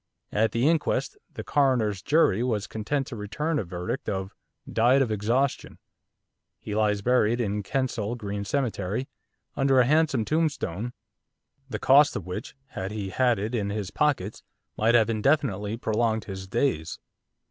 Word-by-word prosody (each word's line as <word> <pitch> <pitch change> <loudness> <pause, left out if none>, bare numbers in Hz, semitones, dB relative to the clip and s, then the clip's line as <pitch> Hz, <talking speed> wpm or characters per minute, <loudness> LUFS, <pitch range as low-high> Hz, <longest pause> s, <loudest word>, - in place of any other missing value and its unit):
At 110 +2 +2
the 120 +4 +1
inquest 160 -1 +1 0.2
the - - -7
coroner's 120 -9 +1
jury 145 - +3
was 110 -4 0
content 135 +6 -2
to 130 - -7
return 150 +10 -2
a - - -1
verdict 90 0 -4
of 95 0 -3 0.3
'Died 120 +4 +3
of 130 -5 +1
exhaustion.' 115 +6 0 0.8
He 105 - -6
lies 105 -1 +1
buried 120 -1 +3
in 105 -3 -1
Kensal 120 -1 -2
Green 100 -3 -4
Cemetery, 110 -1 -2 0.5
under 135 -1 +3
a 125 - +5
handsome 150 -4 +2
tombstone, 125 - -1 0.8
the 110 - -3
cost 145 +5 +5
of 95 - -4
which, 90 +8 -6
had 95 +1 -5
he 105 -2 -4
had 125 -1 +2
it 105 +4 -3
in 105 -4 -1
his 100 -2 -3
pockets, 130 -9 0 0.3
might 115 +2 +3
have 110 -3 +5
indefinitely 115 -3 +1
prolonged 110 -1 0
his 95 -1 -7
days. 90 - -1
110 Hz, 150 wpm, -26 LUFS, 105-130 Hz, 0.8 s, a